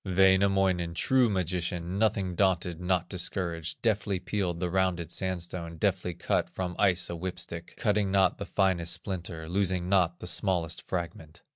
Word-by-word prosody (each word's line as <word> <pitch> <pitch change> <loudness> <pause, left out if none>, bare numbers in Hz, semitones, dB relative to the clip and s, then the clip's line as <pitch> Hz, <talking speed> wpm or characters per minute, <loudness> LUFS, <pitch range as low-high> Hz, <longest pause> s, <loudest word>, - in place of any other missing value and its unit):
Wainamoinen, 95 -2 +3
true 130 +4 +3
magician, 90 -1 -2
Nothing 100 -4 +1
daunted, 90 -2 +1
not 90 -1 0
discouraged, 85 -2 -3
Deftly 100 -4 +1
peeled 90 -2 -2
the 90 -1 -2
rounded 90 -3 0
sandstone, 85 -3 -3
Deftly 85 +2 0
cut - - 0
from 90 -1 -4
ice 95 -3 +3
a - - -3
whip 90 +1 -4
stick, 85 -1 -6
Cutting 105 -4 +1
not 95 -1 +3
the 100 - -5
finest 90 -4 +1
splinter, 85 -2 -5
Losing 90 0 0
not 90 -3 +3
the - - -7
smallest 90 -3 +1
fragment. 85 -2 -5
90 Hz, 150 wpm, -29 LUFS, 85-95 Hz, -, Wainamoinen